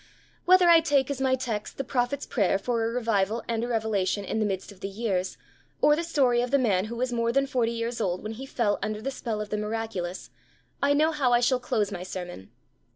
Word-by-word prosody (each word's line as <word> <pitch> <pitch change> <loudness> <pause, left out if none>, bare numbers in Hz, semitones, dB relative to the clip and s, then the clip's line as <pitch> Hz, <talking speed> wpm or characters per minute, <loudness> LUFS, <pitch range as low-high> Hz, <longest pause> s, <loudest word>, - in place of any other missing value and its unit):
Whether 365 0 +6
I 335 -1 +8
take 285 -4 +1
as 270 -1 -4
my 260 -1 +3
text 235 -5 -4
the 275 - -2
prophet's 265 +2 -1
prayer 200 -5 +1
for 230 +3 -1
a - - 0
revival 225 -2 0
and 230 -1 -1
a - - -2
revelation 215 -4 0
in 220 - -2
the 215 - +1
midst 195 0 -4
of 195 - -15
the 195 - -4
years, 195 -3 -2 0.4
or 295 0 +5
the 335 - -2
story 265 -7 +2
of 245 - -2
the 280 - +4
man 205 -7 +2
who 230 +2 -6
was 250 +1 -1
more 230 0 +1
than 275 +3 +2
forty 245 -4 0
years 230 0 -3
old 180 -3 -1
when 215 - -4
he 260 +5 -7
fell 220 -6 0
under 210 +1 -2
the 270 - -2
spell 230 -5 -4
of 210 - -6
the 210 - 0
miraculous, 210 -5 -4 0.5
I 285 +1 +3
know 310 +2 +3
how 275 -6 +1
I 240 - +5
shall 250 +1 +2
close 215 -4 -1
my 180 - -5
sermon. 180 - -7
230 Hz, 235 wpm, -27 LUFS, 210-260 Hz, 0.5 s, I